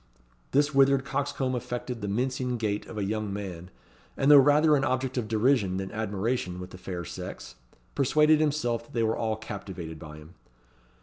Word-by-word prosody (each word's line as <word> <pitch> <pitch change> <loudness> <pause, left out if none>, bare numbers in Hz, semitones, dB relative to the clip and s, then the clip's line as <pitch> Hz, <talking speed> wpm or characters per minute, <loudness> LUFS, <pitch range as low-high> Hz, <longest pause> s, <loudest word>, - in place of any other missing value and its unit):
This 145 +2 +2
withered 135 0 +4
coxcomb 135 -2 -1
affected 120 -1 -4
the 105 - -3
mincing 125 +3 -1
gait 105 -2 -2
of 110 - -8
a 105 - -1
young 105 +1 -2
man; 95 -3 -6 0.5
and 135 +2 +4
though 145 - +10
rather 150 +3 +5
an 135 - +1
object 130 -1 -1
of 120 -4 -2
derision 110 -3 +2
than 95 0 -4
admiration 105 -2 -2
with 90 0 -8
the 90 - -11
fair 90 -2 -5
sex, - - -7 0.4
persuaded 150 +3 +4
himself 130 -7 -1
they 115 -1 0
were 110 0 +1
all 110 -1 -1
captivated 95 -7 -7
by 75 -1 -10
him. 75 +3 -14
115 Hz, 175 wpm, -27 LUFS, 100-135 Hz, 0.5 s, though